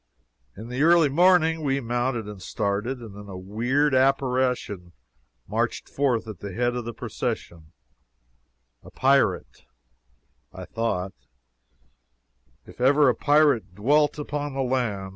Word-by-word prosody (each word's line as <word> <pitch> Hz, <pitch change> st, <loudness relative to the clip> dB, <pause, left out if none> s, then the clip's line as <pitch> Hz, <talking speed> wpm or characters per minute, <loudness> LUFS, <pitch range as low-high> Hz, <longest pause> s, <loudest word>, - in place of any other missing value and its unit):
In 110 Hz, +3 st, -9 dB
the 125 Hz, +2 st, -3 dB
early 165 Hz, -1 st, +5 dB
morning 165 Hz, +1 st, +3 dB
we 140 Hz, -2 st, 0 dB
mounted 120 Hz, -2 st, -2 dB
and 105 Hz, -3 st, -9 dB
started. 105 Hz, +7 st, -2 dB
And 110 Hz, -4 st, -10 dB
then 105 Hz, 0 st, -10 dB
a 95 Hz, -, -7 dB
weird 120 Hz, +10 st, 0 dB
apparition 130 Hz, -8 st, 0 dB, 0.5 s
marched -, -, -2 dB
forth 125 Hz, -5 st, 0 dB
at 105 Hz, -6 st, -8 dB
the 100 Hz, -2 st, -7 dB
head 120 Hz, +3 st, 0 dB
of 120 Hz, -2 st, -4 dB
the 120 Hz, -, -4 dB
procession 80 Hz, -2 st, -5 dB, 1.1 s
a -, -, -14 dB
pirate, -, -, +1 dB, 0.9 s
I -, -, -9 dB
thought, 95 Hz, -5 st, -3 dB, 1.5 s
if -, -, -13 dB
ever 140 Hz, +2 st, +5 dB
a 120 Hz, -, +1 dB
pirate 145 Hz, -10 st, +2 dB
dwelt 145 Hz, +9 st, +2 dB
upon 145 Hz, -1 st, -4 dB
land. 125 Hz, -7 st, -1 dB
125 Hz, 125 wpm, -25 LUFS, 105-140 Hz, 1.5 s, early